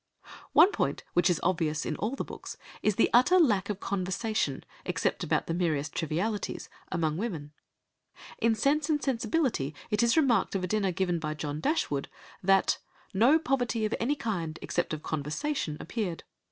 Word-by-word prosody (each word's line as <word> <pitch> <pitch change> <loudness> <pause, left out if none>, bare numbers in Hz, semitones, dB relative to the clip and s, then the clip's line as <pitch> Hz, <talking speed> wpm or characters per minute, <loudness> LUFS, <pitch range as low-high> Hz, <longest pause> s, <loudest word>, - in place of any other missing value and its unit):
One 385 - +7
point - - -1
which 175 +1 +4
is 175 - +2
obvious 160 -4 0
in 155 - -2
all 225 +6 -2
the - - -3
books - - -8 0.2
is 210 - +2
the 230 - +3
utter 255 +10 +6
lack 215 - +3
of 205 -2 -2
conversation, 195 - -1 0.2
except - - -1
about - - +1
the 165 - -2
merest 155 -4 0
trivialities, 180 +7 -2 0.2
among 160 -3 0
women. 170 -9 -4 0.9
In 230 0 +3
Sense 285 +7 +1
and 300 -1 +2
Sensibility 250 - 0 0.2
it 210 - +2
is 235 +5 +3
remarked 265 -9 +3
of 190 - -1
a - - 0
dinner 200 -1 +1
given 175 -1 0
by 155 -1 -3
John 145 0 -4
Dashwood 155 - 0 0.3
that 195 0 +3 0.3
"no 240 +11 +5
poverty 245 -7 0
of 215 - -1
any 270 +6 +1
kind, 175 - -3
except 175 - -1
of 155 -1 -4
conversation, 155 - -2
appeared.... 195 -8 -3
195 Hz, 165 wpm, -29 LUFS, 160-235 Hz, 0.9 s, One